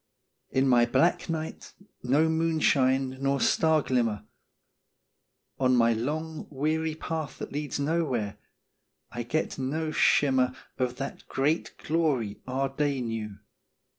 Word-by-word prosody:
In 135 Hz, +1 st, +2 dB
my 120 Hz, -2 st, +5 dB
black 170 Hz, +8 st, +2 dB
night 160 Hz, -1 st, -5 dB, 0.3 s
no 140 Hz, +6 st, +3 dB
moonshine 135 Hz, -5 st, +2 dB
nor 140 Hz, 0 st, +1 dB
star 160 Hz, +1 st, +3 dB
glimmer 115 Hz, -5 st, 0 dB, 1.3 s
On 130 Hz, -1 st, +3 dB
my 115 Hz, -1 st, +4 dB
long, 155 Hz, +7 st, -3 dB
weary 155 Hz, +2 st, -1 dB
path 160 Hz, -4 st, -4 dB
that -, -, -6 dB
leads 145 Hz, 0 st, -3 dB
Nowhere 140 Hz, -9 st, -1 dB, 0.7 s
I 120 Hz, -, -4 dB
get 140 Hz, +5 st, -2 dB
no 155 Hz, +4 st, -2 dB
shimmer 130 Hz, -4 st, +3 dB, 0.2 s
Of 125 Hz, -1 st, 0 dB
that 135 Hz, +1 st, -6 dB
great 150 Hz, +5 st, 0 dB
glory 145 Hz, -10 st, 0 dB
our 135 Hz, +1 st, -1 dB
day 140 Hz, 0 st, -1 dB
knew. 110 Hz, -4 st, -4 dB
135 Hz, 120 wpm, -28 LUFS, 125-155 Hz, 1.3 s, my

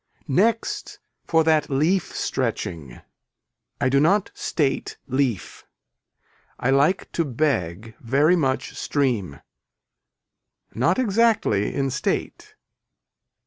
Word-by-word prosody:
Next 220 Hz, -, 0 dB, 0.3 s
for 165 Hz, -1 st, +3 dB
that 155 Hz, -2 st, +2 dB
leaf 160 Hz, +7 st, 0 dB
stretching. 70 Hz, -8 st, -3 dB, 0.8 s
I -, -, +1 dB
do 135 Hz, +1 st, +3 dB
not 195 Hz, +7 st, +2 dB
state 140 Hz, -4 st, -2 dB
leaf. 130 Hz, -7 st, -2 dB, 1.0 s
I 130 Hz, -, +1 dB
like 145 Hz, +7 st, +2 dB
to 165 Hz, -, 0 dB
beg 115 Hz, -, -2 dB
very 140 Hz, +8 st, +3 dB
much 135 Hz, -6 st, -1 dB
stream. 115 Hz, -, -1 dB, 1.3 s
Not 160 Hz, +10 st, +1 dB
exactly 220 Hz, -, +2 dB
in 135 Hz, -1 st, 0 dB
state. -, -, -3 dB
140 Hz, 95 wpm, -23 LUFS, 120-170 Hz, 1.3 s, for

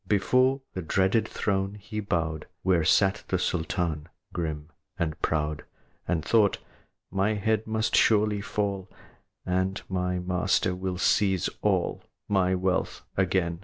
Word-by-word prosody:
Before 130 Hz, +6 st, +3 dB
the 95 Hz, -, -3 dB
dreaded 95 Hz, +6 st, +2 dB
throne 95 Hz, 0 st, -1 dB
he 105 Hz, +2 st, -6 dB
bowed 80 Hz, -6 st, -2 dB, 0.2 s
Where 90 Hz, -3 st, +3 dB
sat 95 Hz, +4 st, +3 dB
the 95 Hz, -, +1 dB
Sultan, 85 Hz, -3 st, -1 dB, 0.2 s
grim 80 Hz, -3 st, -3 dB, 0.3 s
and 80 Hz, -3 st, -2 dB
proud, 75 Hz, -1 st, -1 dB, 0.4 s
And 80 Hz, -2 st, 0 dB
thought, 105 Hz, -3 st, +4 dB, 0.5 s
"My 100 Hz, +3 st, +1 dB
head 110 Hz, +1 st, 0 dB
must 110 Hz, 0 st, 0 dB
surely 105 Hz, -2 st, +3 dB
fall, 100 Hz, -2 st, -2 dB, 0.6 s
And 95 Hz, +1 st, 0 dB
then -, -, -9 dB
my 90 Hz, -1 st, -1 dB
master 90 Hz, +1 st, +1 dB
will 90 Hz, 0 st, -3 dB
seize 95 Hz, -1 st, +2 dB
all -, -, +1 dB, 0.3 s
My 95 Hz, -2 st, +2 dB
wealth 95 Hz, 0 st, -1 dB
again." 90 Hz, -3 st, +1 dB
95 Hz, 130 wpm, -27 LUFS, 90-100 Hz, 0.6 s, thought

